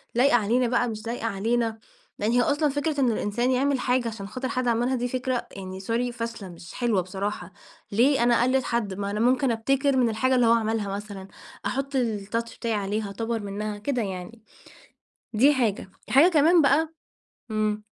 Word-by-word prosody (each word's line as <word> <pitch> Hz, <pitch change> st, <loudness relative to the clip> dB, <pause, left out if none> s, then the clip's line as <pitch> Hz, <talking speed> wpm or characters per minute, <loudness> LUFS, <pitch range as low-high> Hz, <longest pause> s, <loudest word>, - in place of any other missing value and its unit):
لايقة 250 Hz, +2 st, +4 dB
علينا 240 Hz, +3 st, +2 dB
بقى 240 Hz, 0 st, +1 dB
مش 220 Hz, 0 st, -6 dB
لايقة 235 Hz, 0 st, -3 dB
علينا، 225 Hz, +2 st, 0 dB, 0.4 s
لأن 210 Hz, +3 st, +1 dB
هي 245 Hz, -, +4 dB
أصلًا 290 Hz, +4 st, +2 dB
فكرة 290 Hz, +1 st, -1 dB
إن 245 Hz, -3 st, +3 dB
الإنسان 235 Hz, +4 st, 0 dB
يعمل 270 Hz, +1 st, +1 dB
حاجة 250 Hz, -1 st, +1 dB
عشان 215 Hz, -3 st, -6 dB
خاطر 255 Hz, +5 st, -4 dB
حد 255 Hz, -1 st, -1 dB
عملها 240 Hz, +3 st, +1 dB
دي 245 Hz, 0 st, -1 dB
فكرة 255 Hz, 0 st, -2 dB
يعني 190 Hz, -1 st, -7 dB
sorry 235 Hz, +5 st, -1 dB
فاشلة، 230 Hz, -4 st, -5 dB
مش 170 Hz, 0 st, -12 dB
حلوة 235 Hz, -6 st, +1 dB
بصراحة، 190 Hz, 0 st, -5 dB, 0.4 s
ليه 240 Hz, +5 st, +3 dB
أنا 240 Hz, -1 st, +4 dB
أقلد 255 Hz, +1 st, +2 dB
حد؟ 225 Hz, -6 st, -1 dB
ما 200 Hz, +1 st, -3 dB
أنا 210 Hz, -, -2 dB
ممكن 250 Hz, +2 st, +3 dB
أبتكر 265 Hz, +4 st, +1 dB
من 240 Hz, -2 st, +3 dB
الحاجة 255 Hz, +4 st, +1 dB
اللي 245 Hz, -2 st, +4 dB
هو 230 Hz, -, +5 dB
عملها 220 Hz, -3 st, 0 dB
مثلًا، 200 Hz, -2 st, -8 dB, 0.4 s
أحط 275 Hz, +2 st, -2 dB
الtouch 230 Hz, 0 st, -2 dB
بتاعي 230 Hz, -2 st, -2 dB
عليها، 205 Hz, 0 st, -2 dB
أطور 225 Hz, +3 st, -3 dB
منّها، 205 Hz, +1 st, -4 dB
كده 250 Hz, +4 st, -2 dB
يعني. 195 Hz, +3 st, -6 dB, 0.9 s
دي 270 Hz, +7 st, +5 dB
حاجة، 215 Hz, -6 st, -1 dB, 0.2 s
حاجة 285 Hz, +6 st, +7 dB
كمان 325 Hz, +1 st, +5 dB
بقى 285 Hz, +4 st, +3 dB, 0.6 s
إمم، 215 Hz, 0 st, -1 dB
230 Hz, 180 wpm, -25 LUFS, 210-255 Hz, 0.9 s, حاجة